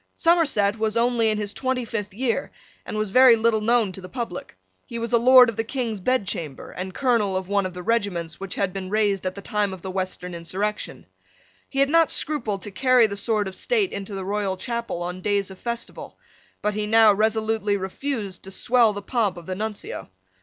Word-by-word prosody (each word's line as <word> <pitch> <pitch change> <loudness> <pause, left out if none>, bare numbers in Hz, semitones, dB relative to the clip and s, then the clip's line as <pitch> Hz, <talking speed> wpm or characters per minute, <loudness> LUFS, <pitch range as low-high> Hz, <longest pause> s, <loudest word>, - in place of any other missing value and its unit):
Somerset 275 - +2
was 220 +1 0
only 235 -1 +2
in 215 - 0
his 205 -1 -3
twenty 260 -2 -1
fifth 210 -2 -4
year, 245 +5 -2 0.4
and - - -4
was 215 -2 -2
very 255 +1 +7
little 225 -1 +2
known 225 -2 +2
to 190 - -9
the 185 - -10
public, 230 - -6 0.3
He 235 - -6
was 230 0 -4
a 235 - +6
Lord 250 +1 +8
of 230 -2 -4
the 225 - 0
King's 230 -3 -3
Bedchamber, 185 - -2
and 185 +1 -5
colonel 220 -5 +1
of 185 -1 -4
one 200 -1 +1
of 180 - -11
the 180 - -6
regiments 190 -8 -1
which 195 0 -5
had 195 -2 -1
been 190 -1 -5
raised 200 -3 +1
at 185 - -4
the 200 - -9
time 205 -1 0
of 180 - -17
the 190 - -4
Western 185 -1 -3
insurrection. 190 +5 -3 0.6
He 270 - -8
had 275 - +3
not 330 -1 +5
scrupled 225 -10 -2
to 205 - -6
carry 255 +2 +4
the 200 -2 -2
sword 210 0 0
of 190 - -6
state 435 -6 +1
into 200 0 -5
the 190 -1 -4
royal 200 -1 -1
chapel 235 -4 -3
on 180 +1 -5
days 200 -1 0
of 190 - -12
festival: 235 -1 -5 0.5
but 210 0 +1
he 210 0 -2
now 220 -1 +6
resolutely 220 0 +1
refused 200 0 -4
to - - -8
swell 230 +3 +3
the 205 0 -6
pomp 215 -6 0
of 170 - -10
the 185 - -4
Nuncio. 210 - -5
210 Hz, 210 wpm, -24 LUFS, 190-235 Hz, 0.6 s, Lord